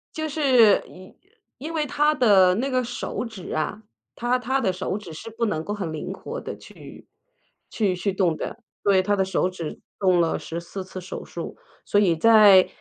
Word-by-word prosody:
就 315 0 -2
是 260 -9 +4
因 185 +1 -14 0.4
因 310 +5 -6
为 310 -2 0
他 295 +2 +2
的 195 -8 +5
那 255 +7 -1
个 255 -1 +1
手 245 0 -4
指 220 -7 -8
啊， 155 +7 -2 0.3
他 240 +1 0
他 260 +2 0
的 195 -8 0
手 185 +1 -3
指 190 -6 -10
是 160 +8 -8
不 225 +1 -2
能 160 -8 -2
够 205 - -4
很 185 -6 -4
灵 170 +4 -5
活 460 - -6
地 - - -7
去 - - -14 0.6
去 200 -5 0
去 195 +3 -1
动 185 -4 +1
的。 230 - -6 0.2
对， 195 -2 +4
他 205 +2 +1
的 190 - +1
手 190 -1 0
指 170 -4 -7 0.2
动 185 -3 +3
了 165 -1 +1
14 170 +3 -6
次 185 0 -8
手 185 - -7
术， - - -7 0.3
所 205 - +3
以 175 -5 +3
在 205 0 +7
200 Hz, 200 characters per minute, -24 LUFS, 185-240 Hz, 0.6 s, 在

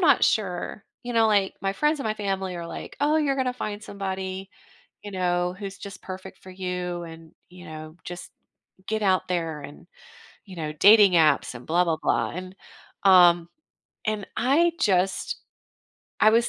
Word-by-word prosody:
not 335 - +5
sure 195 -1 -1 0.2
You 245 - -5
know, 225 -1 +4
like, 200 -2 +2
my 195 0 0
friends 300 +6 +1
and - - -4
my 215 - 0
family 195 -3 -3
are 170 -1 -5
like, 165 - -8
"Oh, 300 +2 +3
you're 285 -3 +1
gonna 260 -2 0
find 210 -4 -5
somebody," 190 -2 -5 0.5
you 205 - -7
know, 180 -1 0
"who's 195 -1 -7
just 200 -1 -9
perfect 185 0 -8
for 185 - -11
you 180 -2 -4
and," 165 -1 -12 0.2
you 180 0 -13
know, 155 0 -9
"just 175 0 -8 0.6
get 220 0 -1
out 190 -2 +2
there 165 -4 -2
and," 145 +4 -11 0.6
you 190 -3 -12
know, 155 -2 -3
"dating 205 +3 +7
apps, 155 -6 +3
and 125 0 -10
blah 175 +3 +3
blah 165 -2 0
blah," 115 -2 +1
and, 185 +1 -7 0.5
um, 175 -3 +6 0.6
and 215 -2 -1
I 310 +8 +3
just 190 -1 +1 0.8
I 215 - +7
was 230 +2 +3
190 Hz, 170 wpm, -25 LUFS, 175-215 Hz, 0.8 s, dating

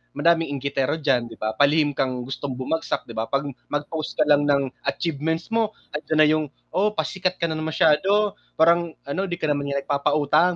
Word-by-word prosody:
madaming 165 +3 +3
inggitero 140 +1 -1
diyan, 135 -7 +1
'di 115 - -11
ba? 110 0 -2
Palihim 145 +1 +4
kang 130 -2 -2
gustong 135 +1 -5
bumagsak 130 +6 -2
'di - - -10
ba, 110 0 -2
pag 140 +1 0 0.3
mag-post 145 +1 -3
ka - - +5
lang 145 -1 +4
ng 140 -2 +2 0.2
achievements 160 +4 -2
mo 225 -1 +1 0.2
andiyan 155 +1 -2
na 155 - +7
yung, 155 0 +2 0.3
"Oh, 205 +3 +3
pasikat 185 +4 -1
ka - - 0
na 155 - -3
masyado," 160 +6 +3 0.2
parang 170 0 +3
ano, 180 +8 -2
"Di 175 - -2
ka - - -16
naman 140 0 -1
nagpapautang," 145 +4 +2
150 Hz, 180 wpm, -23 LUFS, 140-165 Hz, 0.3 s, na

